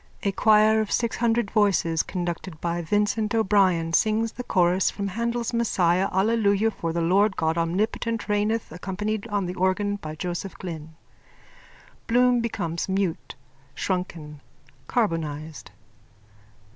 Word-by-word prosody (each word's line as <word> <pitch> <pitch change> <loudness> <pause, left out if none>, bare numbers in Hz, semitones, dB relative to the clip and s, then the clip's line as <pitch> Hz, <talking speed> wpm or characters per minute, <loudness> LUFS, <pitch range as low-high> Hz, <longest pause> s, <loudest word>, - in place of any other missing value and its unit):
(A 200 - +1
choir 215 +2 +4
of 215 - -4
six 235 -1 0
hundred 235 -3 +1
voices, 190 -7 +2
conducted 175 -2 -5
by 170 0 -2
Vincent 210 +5 0
O'Brien, 190 -6 +2
sings 220 +4 +2
the 250 - -7
chorus 180 -3 +2
from 200 -1 -4
Handel's 235 +3 -2
Messiah 190 -5 +2
Alleluia 210 +1 +2
for 165 -5 -4
the 170 +1 -1
Lord 195 +4 +3
God 160 0 +1
Omnipotent 205 +6 -1
reigneth, 210 +2 0
_accompanied 205 +5 -4
on 200 -2 0
the 180 - -4
organ 190 +2 0
by 155 -5 -7
Joseph 175 +4 -4
Glynn. 160 -4 -8 1.1
Bloom 245 +1 +4
becomes 180 -8 -3
mute, 190 -3 -2 0.4
shrunken, 165 -6 -4 0.5
carbonised.) 160 -8 -2
195 Hz, 125 wpm, -25 LUFS, 170-220 Hz, 1.1 s, choir